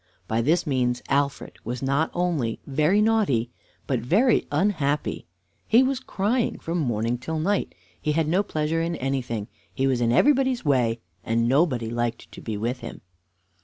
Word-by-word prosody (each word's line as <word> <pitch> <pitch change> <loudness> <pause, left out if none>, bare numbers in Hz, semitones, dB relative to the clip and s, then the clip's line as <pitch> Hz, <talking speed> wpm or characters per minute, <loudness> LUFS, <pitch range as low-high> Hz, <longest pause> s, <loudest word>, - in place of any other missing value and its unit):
By 110 +1 +1
this 160 +8 +2
means 125 -4 0
Alfred 140 0 -1
was 125 +3 -4
not 140 +4 +1
only 165 -11 0
very 155 +9 +2
naughty, 190 - +2 0.3
but 130 -3 0
very 210 - +2
unhappy. 150 - 0 0.4
He 235 +4 +6
was 265 -1 0
crying 235 0 -1
from 170 +2 -3
morning 120 -3 -1
till 160 +6 -4
night. 195 +6 0 0.3
He 150 - 0
had 160 0 +1
no 180 +5 +3
pleasure 160 -3 -1
in 170 +1 -1
anything; 125 -6 -2 0.2
he 135 - -1
was 130 -2 +1
in 115 -1 +2
everybody's 260 - +3
way, 120 -5 +2 0.2
and 115 +1 +1
nobody 130 -4 +2
liked 120 -1 -3
to - - -10
be 110 -2 -4
with 120 +4 -2
him. - - -8
140 Hz, 165 wpm, -25 LUFS, 120-175 Hz, 0.4 s, He